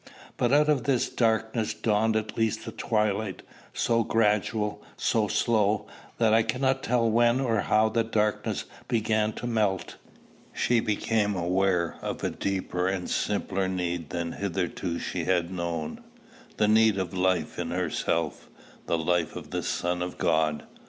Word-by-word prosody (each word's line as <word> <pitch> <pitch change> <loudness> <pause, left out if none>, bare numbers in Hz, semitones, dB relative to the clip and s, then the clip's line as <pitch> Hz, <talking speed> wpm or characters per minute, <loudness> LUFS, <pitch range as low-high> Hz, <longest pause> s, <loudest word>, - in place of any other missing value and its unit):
But 120 - +1
out 150 +1 +5
of 140 -6 +2
this 130 -3 +2
darkness 110 -1 0
dawned 110 0 +1
at 110 0 -2
least 110 -1 0
a 115 - -5
twilight, 105 -3 -1 0.3
so 115 -1 +1
gradual, 105 -1 +1 0.2
so 110 -2 +1
slow, 105 -2 +1 0.3
that 110 -2 +3
I 115 - +6
cannot 130 +3 0
tell 120 -1 +1
when 120 +2 +3
or 115 -5 +1
how 110 +2 +3
the 115 +1 +1
darkness 105 -2 -1 0.2
began 110 -2 +1
to - - -6
melt. 105 -6 0 0.6
She 120 -1 +2
became 105 -1 0
aware 90 -1 +1
of - - -4
a - - 0
deeper 95 -2 -2
and 95 -2 -2
simpler 100 -2 0
need 90 -4 -2
than 85 -1 -3
hitherto 90 -2 -2
she 85 -1 -3
had 90 -1 +1
known, 85 -3 -4 0.5
the 105 - +3
need 110 -1 +5
of 95 -2 -3
life 90 -4 0
in 85 -1 -2
herself, 85 -2 -1 0.4
the 85 - +1
life 85 0 0
of - - -8
the - - -1
Son 90 0 -1
of 90 0 -4
God. 80 -2 +1
105 Hz, 150 wpm, -27 LUFS, 90-115 Hz, 0.6 s, I